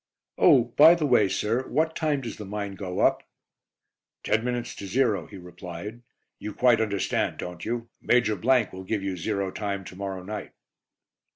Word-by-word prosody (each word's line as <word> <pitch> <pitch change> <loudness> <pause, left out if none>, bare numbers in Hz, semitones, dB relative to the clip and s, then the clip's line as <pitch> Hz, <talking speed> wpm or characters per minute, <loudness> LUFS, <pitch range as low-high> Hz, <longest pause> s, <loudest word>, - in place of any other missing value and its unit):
"Oh, 125 - +6
by 160 +4 +9
the 165 -3 -1
way, 120 -7 +4
sir, 115 +7 -1
what 160 +1 0
time 150 -3 0
does 115 -4 -6
the 105 - -7
mine 100 0 -4
go 95 -2 -4
up?" - - +3 1.0
"Ten 110 +1 +1
minutes 120 -1 -3
to 100 - -6
zero," 105 -5 +1
he - - -11
replied. 90 +5 -9 0.4
"You 105 - -6
quite 120 -3 +4
understand, 100 -3 -1
don't 90 -1 -7
you? 115 0 -3
Major 120 -3 +2
will 110 -3 +1
give 100 +1 -2
you 95 -1 -2
zero 100 +2 -2
time 100 -1 -3
to 90 - -11
morrow 95 -1 -5
night." 105 +2 -6
105 Hz, 170 wpm, -26 LUFS, 95-120 Hz, 1.0 s, by